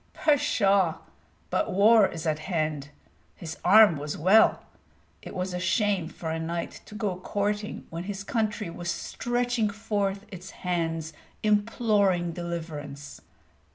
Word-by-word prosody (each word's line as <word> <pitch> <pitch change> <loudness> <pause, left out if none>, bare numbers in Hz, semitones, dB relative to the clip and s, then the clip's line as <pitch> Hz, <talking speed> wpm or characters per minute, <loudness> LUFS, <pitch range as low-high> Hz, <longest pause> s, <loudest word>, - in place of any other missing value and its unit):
Pshaw! 195 - +2 0.6
but - - 0
war 210 +1 +6
is 165 -2 -7
at 155 -1 0
hand. 155 -4 -2 0.5
His 160 -2 -8
arm 205 -3 +7
was 145 +1 -5
well. 195 +7 +5 0.6
It - - -9
was 185 0 -3
a 180 - -2
shame 190 -2 +1
for 160 -2 -6
a 160 - -2
knight 170 +1 -4
to 210 - -11
go 205 -4 -2
courting 205 +2 -2
when 165 +2 -5
his 200 0 -5
country 215 -5 -2
was 175 0 -5
stretching 240 0 -1
forth 200 -2 -2
its 185 -1 -9 0.2
hands 165 -3 -1 0.3
imploring 205 -4 +2
deliverance. 160 -4 -6
185 Hz, 130 wpm, -27 LUFS, 165-210 Hz, 0.6 s, arm